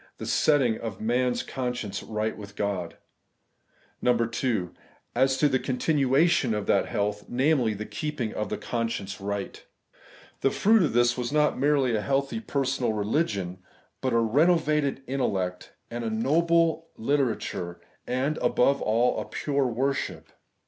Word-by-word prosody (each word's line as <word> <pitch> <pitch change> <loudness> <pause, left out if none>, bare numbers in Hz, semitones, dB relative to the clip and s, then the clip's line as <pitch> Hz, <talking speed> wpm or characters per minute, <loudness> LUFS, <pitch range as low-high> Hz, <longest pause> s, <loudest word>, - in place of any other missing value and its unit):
the - - -6
setting 135 -7 +2
of 110 -4 -5
a - - -7
man's 125 +2 +1
con 125 -2 -3
science 105 -4 -4
right 110 0 -2
with 100 -1 -10
God; 100 -5 -3 1.1
(2) 115 -5 0 0.4
As 130 +2 +2
to 150 - +4
the 130 -2 +1
continuation 135 -1 +2
of 105 -1 -2
that - - +2
health, 105 0 -2
viz. 125 -4 +2
the 105 - -5
keeping 120 +1 -3
of 105 -2 -3
the - - -2
conscience 115 -5 -3
right. 100 0 -4 0.8
The 135 - +3
fruit 220 +8 +4
of 155 - +1
this 120 0 +3
was 120 +1 -2
not 150 -2 +2
merely 135 -4 +2
a 105 - 0
healthy 140 - 0
per 140 -11 -1
sonal 125 -4 0
religion, 100 - -1 0.4
but 130 - 0
a 115 - +3
renovated 150 +3 +2
intellect 95 -9 -2 0.2
and 120 0 -4
a 115 - -1
noble 165 +7 +2
literature, 115 -9 -1 0.3
and, 135 +5 -1
above 140 +3 +2
all, 115 +3 +2
a - - -6
pure 140 -2 -1
worship. 135 +3 -2
125 Hz, 150 wpm, -27 LUFS, 110-140 Hz, 1.1 s, to